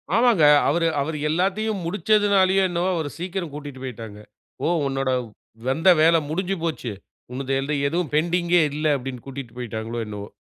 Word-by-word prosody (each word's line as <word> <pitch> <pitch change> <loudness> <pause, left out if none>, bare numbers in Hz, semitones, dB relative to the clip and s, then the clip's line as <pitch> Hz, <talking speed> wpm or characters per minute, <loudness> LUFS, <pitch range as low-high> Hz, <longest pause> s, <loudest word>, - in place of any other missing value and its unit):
ஆமாங்க. 230 -7 +4 0.3
அவரு 165 +2 +2
அவரு 155 +2 -3
எல்லாத்தையும் 195 +5 0
முடிச்சதுனாலையோ, 200 0 +3
என்னவோ 175 +1 0
அவர 160 -3 -2
சீக்கிரம் 175 -2 -4
கூட்டிட்டு 145 -3 -8
போயிட்டாங்க. 115 -5 -7 0.4
போ - - 0 0.2
"உன்னோட 135 0 -1 0.6
வந்த 160 +8 +3
வேல 165 +1 +6
முடிஞ்சு 185 +4 -1
போச்சு. 155 -8 -3 0.4
உன்னது 135 +1 -3
எது 140 +2 -2 0.2
எதுவும் 170 -1 -2
பெண்டிங்கே 175 +2 +2
இல்லை" 155 +1 0
அப்படின்னு 125 -2 -7
கூட்டிட்டு 135 -3 -8
போயிட்டாங்களோ 115 -1 -4
என்னவோ. 105 -1 -7
160 Hz, 145 wpm, -23 LUFS, 135-180 Hz, 0.6 s, வேல